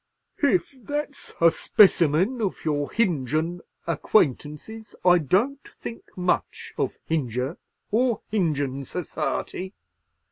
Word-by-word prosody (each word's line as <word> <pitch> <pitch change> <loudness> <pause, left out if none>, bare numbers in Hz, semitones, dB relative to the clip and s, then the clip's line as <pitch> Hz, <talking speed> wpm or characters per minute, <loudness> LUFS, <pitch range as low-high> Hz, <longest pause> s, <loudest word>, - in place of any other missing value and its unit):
"Hif 305 -1 +1
that's 290 +3 -4
a 165 0 +6
spessermin 185 - +4
of 200 -5 -2
your 145 -2 0
Hinjun 165 - 0 0.3
acquaintances, 170 - 0
I 180 -1 +7
don't 220 - +1 0.2
think 230 - -9
much 180 0 -1
of - - -2
Hinjur 130 -1 -1 0.3
or 235 +1 +2
Hinjun 145 -9 0
serciety. 180 +4 -3
180 Hz, 100 wpm, -25 LUFS, 150-225 Hz, 0.3 s, I